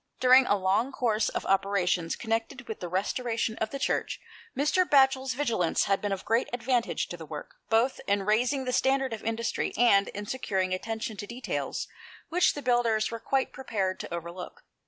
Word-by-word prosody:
During 255 +1 +6
a 205 - +3
long 195 +7 +1
course 225 -4 +1
of - - -4
operations 190 -3 +1
connected 230 +2 -3
with 220 - -5
the 175 - -5
restoration 225 +4 -1
of 220 - -1
the 275 - -5
Church, - - -1 0.4
Mr. 300 +6 +3
Batchel's 265 -4 +3
vigilance 230 - +1
had 195 0 +1
been 205 - -2
of 195 -1 -3
great 230 +3 +1
advantage 245 0 0
to 175 - -6
the 165 - -9
work, 150 0 -8
both 230 +4 +2
in 200 0 +1
raising 245 +6 +1
the 250 - -2
standard 265 0 +2
of 220 - -6
industry 225 +1 -2
and 200 -5 +5
in 205 +1 -6
securing 190 -6 -1
attention 220 +2 -4
to 205 - -6
details 245 +3 -4 0.4
which 355 +2 +3
the 290 - -6
builders 235 -3 +2
were 230 - -4
quite 265 +4 -1
prepared 205 -8 -2
to - - -7
overlook. 170 +1 -7
225 Hz, 180 wpm, -28 LUFS, 195-255 Hz, 0.4 s, During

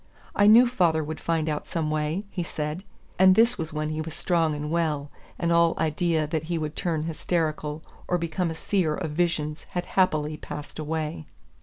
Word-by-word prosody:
"I 205 - +5
knew 230 +4 +8
father 175 -10 +2
would 155 +1 -5
find 165 -2 0
out 150 -1 -2
some 160 -3 -2
way," 155 +6 -1
he 180 - -3
said. 155 +1 -4 0.4
And 185 0 +7
this 230 0 +4
was 160 -1 -3
when 155 0 -2
he 155 0 -2
was 155 0 -6
strong 165 -4 +1
and 150 +1 -4
well, 150 -4 -1 0.3
and 170 0 0
all 170 0 +4
idea 160 0 +1
that 160 +1 -2
he 170 +1 -2
would 155 -1 -3
turn 165 -5 -1
hysterical 155 -2 -2 0.2
or 180 - +2
become 170 +1 -1
a 160 - -4
seer 165 -2 0
of 155 - -4
visions 155 -2 -1
had 175 0 -1
happily 155 -5 +2
passed 150 0 -8
away. 155 0 -3
160 Hz, 190 wpm, -26 LUFS, 155-175 Hz, 0.4 s, knew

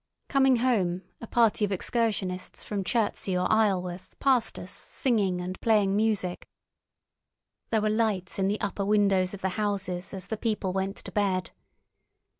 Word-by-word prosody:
Coming 270 -2 +4
home, 200 -8 +1 0.2
a 230 - -7
party 225 -2 +3
of 205 - +1
excursionists 190 -3 -1
from 200 -2 -3
Chertsey 200 -3 0
or 180 - +1
Isleworth 185 -4 0
passed 260 -4 +2
us - - -7
singing 205 - 0
and 180 +1 -5
playing 205 -4 +3
music. 210 -4 0 1.2
There 220 -2 +2
were 215 - +1
lights 210 -5 0
in 190 - +2
the 210 +2 0
upper 205 0 -2
windows 195 -2 +2
of 195 - -12
the 190 - 0
houses 195 -3 -2
as 190 -2 -6
the 220 - -4
people 210 -4 -1
went 195 +1 -1
to - - -10
bed. 190 -3 0
200 Hz, 155 wpm, -28 LUFS, 185-220 Hz, 1.2 s, Coming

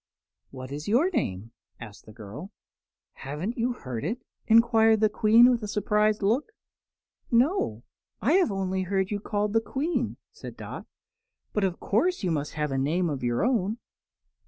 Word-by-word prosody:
"What 130 0 -9
is 145 +2 -6
your 265 - +3
name?" 100 - -2 0.3
asked 110 -3 -11
the - - -11
girl. 110 - -9 0.6
"Haven't 150 - -5
you 245 +1 0
heard 125 - -6
it?" 235 +3 -2 0.3
enquired 225 -1 +5
the 215 0 +3
Queen, 225 +4 +5
with 240 -2 0
a 210 - -4
surprised 210 +1 +1
look. 255 - 0 0.8
"No; 240 - +1 0.4
I 260 - +1
have 360 - +3
only 190 -1 -1
heard 190 +1 -1
you 205 - -1
called 205 0 -2
the 225 - +3
Queen," 295 +9 -2
said - - -10
Dot; - - -8 0.7
"but, 210 - 0
of 185 -2 -1
course, 345 - 0
you 180 - 0
must 150 -2 -2
have 150 -1 -2
a 135 - 0
name 165 +5 0
of 140 - -4
your 120 - +1
own." 225 -4 0
205 Hz, 165 wpm, -27 LUFS, 150-230 Hz, 0.8 s, enquired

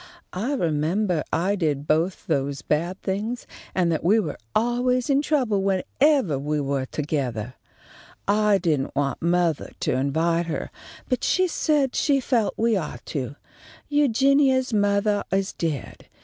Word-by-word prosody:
I 225 +10 -2
remembah 170 - 0
I 185 +5 +1
did 150 -6 -1
both 165 +5 0
those 140 -3 -1
bad 170 +6 -1
things, 210 +5 -3 0.3
and 175 -2 +2
that 160 - -1
we 205 +7 +4
were 160 -9 -3 0.2
always 245 +3 +1
in 275 +1 +3
trouble 255 -10 +1
whenevah 195 - +1
we 150 +1 -1
were 140 -2 -1
togethah. 130 -7 -3 0.7
I 210 0 +3
didn't 155 -8 -1
want 140 -1 -1
mothah 170 -2 0
to - - +1
invite 160 +6 +1
her, 160 - -4 0.4
but 255 - -1
she 370 0 +2
said 295 -5 +1
she 280 -2 +2
felt 240 -5 0
that - - -6
we 230 -1 +3
ought 170 -6 -4
to. 135 -1 -3 0.5
Eugenia's 275 -2 +3
mothah 205 0 +2
is 195 0 0
dead. 155 -5 -4
190 Hz, 145 wpm, -24 LUFS, 150-240 Hz, 0.7 s, we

